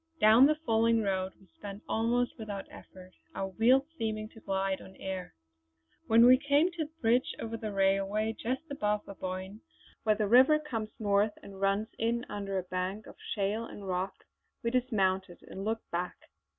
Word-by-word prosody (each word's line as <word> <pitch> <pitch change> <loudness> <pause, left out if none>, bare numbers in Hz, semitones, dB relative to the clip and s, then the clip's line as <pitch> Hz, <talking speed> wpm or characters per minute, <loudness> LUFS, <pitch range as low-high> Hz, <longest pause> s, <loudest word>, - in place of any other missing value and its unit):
Down 225 +5 +7
the 305 - +3
falling 230 -6 +2
road 190 -1 -1
we 195 - -20
sped 200 +1 -9
almost 240 +2 0
without 205 -3 -5
effort, 185 -1 -13 0.2
our 195 0 -2
wheels 245 +7 +4 0.2
seeming 215 -1 -2
to 225 - -15
glide 195 -1 -1
on 190 - -13
air. 190 - -6 0.7
When 230 +1 +7
we 255 +1 +8
came 290 +5 +3
to 335 -3 -3
the 300 - -15
bridge 240 +3 +2
over 230 0 -4
the 220 -2 -4
railway 195 +2 +1
just 255 +6 -3
above 210 -6 -1
Aboyne, 190 +2 -6 0.4
where 215 -1 +3
the 210 0 0
river 255 +8 +6
comes 230 -8 -4
north 205 0 +2
and 195 -1 -11
runs 200 +3 +1
in 235 +2 0
under 195 -1 -3
a 185 - -1
bank 185 +3 -3
of - - -12 0.2
shale 210 +2 -1
and 200 -3 -9
rock, 190 +1 -3 0.4
we 235 - 0
dismounted 195 -7 0
and 190 - -8
looked 220 +2 -2
back. 175 +1 -2
215 Hz, 175 wpm, -30 LUFS, 195-230 Hz, 0.7 s, we